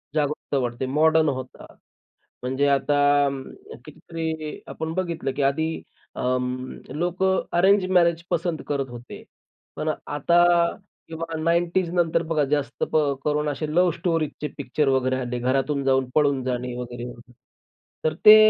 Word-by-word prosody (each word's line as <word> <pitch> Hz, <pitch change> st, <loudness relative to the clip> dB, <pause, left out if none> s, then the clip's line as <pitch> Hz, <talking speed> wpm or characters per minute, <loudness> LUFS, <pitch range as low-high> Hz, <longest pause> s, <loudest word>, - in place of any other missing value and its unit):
जागरूकता 150 Hz, -1 st, -1 dB
वाढते, 120 Hz, 0 st, -2 dB
मॉडर्न 155 Hz, +3 st, +3 dB
होतात. 130 Hz, -2 st, -7 dB, 0.7 s
म्हणजे 130 Hz, +3 st, +1 dB
आता 145 Hz, 0 st, +3 dB, 0.6 s
कितीतरी 160 Hz, -2 st, -5 dB
आपण 160 Hz, 0 st, -4 dB
बघितलं, 170 Hz, -6 st, -2 dB
की 145 Hz, -, -3 dB
आधी 140 Hz, +4 st, +1 dB, 0.5 s
अ, 125 Hz, 0 st, 0 dB, 0.6 s
लोकं 180 Hz, +3 st, +1 dB, 0.2 s
अरेंज 195 Hz, +2 st, +5 dB
मॅरेज 170 Hz, -2 st, +3 dB
पसंत 170 Hz, -1 st, -1 dB
करत 140 Hz, -2 st, -1 dB
होते. 120 Hz, 0 st, -10 dB, 0.5 s
पण -, -, -2 dB, 0.2 s
आता 170 Hz, +4 st, +3 dB, 0.9 s
'90ज 170 Hz, +2 st, +1 dB
नंतर 170 Hz, -2 st, +2 dB
बघा, 155 Hz, -3 st, +2 dB
जास्त 145 Hz, -2 st, -1 dB, 0.4 s
करून 150 Hz, 0 st, 0 dB
असे 145 Hz, +2 st, -3 dB
लव्ह 180 Hz, 0 st, +4 dB
स्टोरीजचे 165 Hz, -3 st, -1 dB
पिक्चर 140 Hz, +2 st, -1 dB
वगैरे 130 Hz, -1 st, +2 dB
आले. 125 Hz, 0 st, -3 dB
घरातून 135 Hz, +3 st, 0 dB
जाऊन 130 Hz, -1 st, +2 dB
पळून 140 Hz, -3 st, +3 dB
जाणे 125 Hz, -1 st, -2 dB
वगैरे, 120 Hz, -1 st, -6 dB
वगैरे. 125 Hz, 0 st, -11 dB, 0.7 s
तर 155 Hz, -, +1 dB
ते 215 Hz, 0 st, +12 dB
150 Hz, 125 wpm, -24 LUFS, 130-165 Hz, 0.9 s, ते